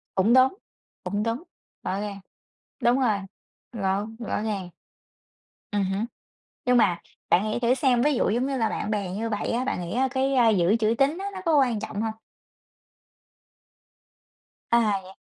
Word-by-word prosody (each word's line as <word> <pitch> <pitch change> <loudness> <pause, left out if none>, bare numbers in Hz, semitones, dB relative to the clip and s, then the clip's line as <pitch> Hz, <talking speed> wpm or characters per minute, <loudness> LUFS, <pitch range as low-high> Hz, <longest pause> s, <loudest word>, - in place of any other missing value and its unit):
Cũng 195 +5 +4
đúng, 260 +1 +6 0.5
cũng 205 +1 -1
đúng, 230 +6 -2 0.4
rõ 190 - -2
ràng, 205 -1 -5 0.6
đúng 240 +3 +4
rồi, 230 -6 +2 0.5
rõ 200 -2 -1
rõ 225 -3 -2
ràng. 200 -4 -3 1.0
Ừm 205 -1 +1
hứm, 195 +3 -1 0.6
nhưng 250 0 +4
mà 185 -7 +3 0.3
bạn 185 - +4
nghĩ - - -1
thử 240 +1 +3
xem, 260 -4 +2
ví 295 +1 +3
dụ - - +1
giống 240 +5 +1
như 275 -1 -1
là 225 -3 +1
bạn - - -3
bè 200 -3 -1
như 215 +5 -3
vậy 210 -2 -2
á, 240 +2 0
bạn 260 - -2
nghĩ 175 -1 -5
á 260 +2 +2
cái, 270 +1 0
à, 245 -3 +5
giữ 195 -1 +3
chữ 225 0 +2
tín 280 +5 +2
á, 390 - -4
nó 375 - -5
có 325 -3 +3
quan 245 -6 +2
trọng 210 0 -4
hông? 225 -1 -1 2.6
À, 220 -4 +3
vậy 185 - -12
225 Hz, 175 wpm, -25 LUFS, 205-255 Hz, 2.6 s, đúng